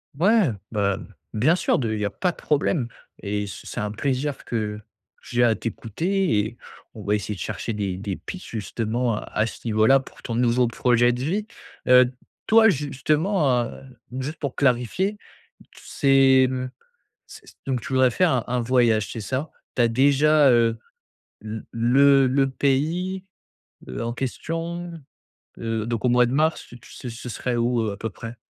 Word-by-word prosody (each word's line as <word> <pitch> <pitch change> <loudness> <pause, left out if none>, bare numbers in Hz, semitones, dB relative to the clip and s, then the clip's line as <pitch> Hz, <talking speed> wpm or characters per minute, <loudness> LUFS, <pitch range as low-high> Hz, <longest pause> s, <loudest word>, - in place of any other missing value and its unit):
Ouais, 200 +5 +4
heu, 115 - -2 0.2
bah, 100 -3 0 0.4
bien 135 +11 +3
sûr, - - +1
de 115 -4 -1
il 110 - -3
y 105 - -1
a - - 0
pas 180 - -1
de - - -18
problème! 145 -3 0 0.3
Et 105 0 -2
c 100 - -8
c'est - - -5
un 105 0 -2
plaisir 135 +5 -2
que 105 -3 -3 0.4
j'ai 120 0 0
à 115 -2 +4
t'écouter 140 - -1
et 110 +3 -3 0.4
on 110 - -8
va 100 +1 0
essayer 105 0 -3
de - - -12
chercher 110 +5 -4
des 100 -3 -3
des 100 0 -4
pistes, 185 - -9
justement, 115 +2 -2
à - - -3 0.2
à 110 - +3
ce 115 - -7
niveau-là 110 +5 +4
pour 135 - -14
ton 115 - -4
nouveau 120 0 +3
projet 120 0 +3
de 125 +1 -3
vie. 200 +9 -1 0.4
Heu 125 0 +7
d 125 - -7 0.3
toi 225 0 +6
justement, 150 -1 +1
heu, - - -10 0.4
juste 150 +5 -5
pour 140 -4 -4
clarifier, 140 - +1
t - - -51 0.6
c'est, 135 -1 +4
hem 130 0 -3 0.6
c - - -13 0.2
donc 130 -2 -1
tu 140 +3 -7
voudrais 130 -1 +4
faire 180 +7 +2
un 125 -3 0
un 125 0 0
voyage, 115 -3 +2
c'est 115 - -5
ça? 130 +9 -3 0.3
Tu 125 - +3
as 120 - +4
déjà, 140 +4 +4
heu, 115 -1 +3 0.6
l 110 +1 -6
le 135 +4 +5
le 135 +1 +2
pays, 160 +8 0 0.6
l'en 115 - -4
question, 165 +7 -4 0.7
heu, 115 -1 -2
donc 115 0 -3
au - - +4
mois 125 0 +5
de 120 - -3
mars 155 +3 +1
tu 120 - -12
ce 125 - -9
ce 120 +2 -8
serait 120 +1 -2
où, 120 0 +1
heu, 110 -2 -1
à - - -7
peu 110 - -3
près? 115 +4 -9
125 Hz, 185 wpm, -24 LUFS, 115-140 Hz, 0.7 s, Heu